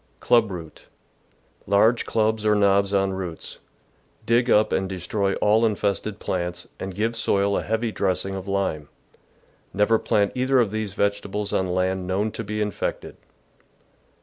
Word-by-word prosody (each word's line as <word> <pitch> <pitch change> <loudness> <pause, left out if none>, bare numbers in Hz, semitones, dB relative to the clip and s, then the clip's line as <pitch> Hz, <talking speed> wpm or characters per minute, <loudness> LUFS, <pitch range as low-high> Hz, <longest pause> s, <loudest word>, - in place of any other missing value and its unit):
Club 115 -3 +3
Root. 85 -4 -9 0.4
— - - -39
Large 110 +4 +3
clubs 110 -1 +1
or 105 -1 +3
knobs 100 -1 +3
on 95 -1 +1
roots. 90 -3 -6 0.7
Dig 120 +2 +2
up 105 -1 +4
and 95 0 0
destroy 95 +2 -1
all 110 +2 +3
infested 105 -1 -1
plants, 90 -3 -4
and 95 -1 -5
give 110 +3 -1
soil 100 -3 +1
a - - -1
heavy^ 110 +1 -1
dressing 95 0 -1
of 95 0 -6
lime. 95 -7 -2 0.9
Never 105 +2 +3
plant 100 -1 +1
either 130 +1 +2
of 115 -5 +2
these 110 -3 -4
vegetables 100 0 -1
on 95 - +1
land 90 0 -1
known 100 +4 0
to 115 - -6
be 105 0 -3
infected. 105 - -4
100 Hz, 150 wpm, -24 LUFS, 95-110 Hz, 0.9 s, up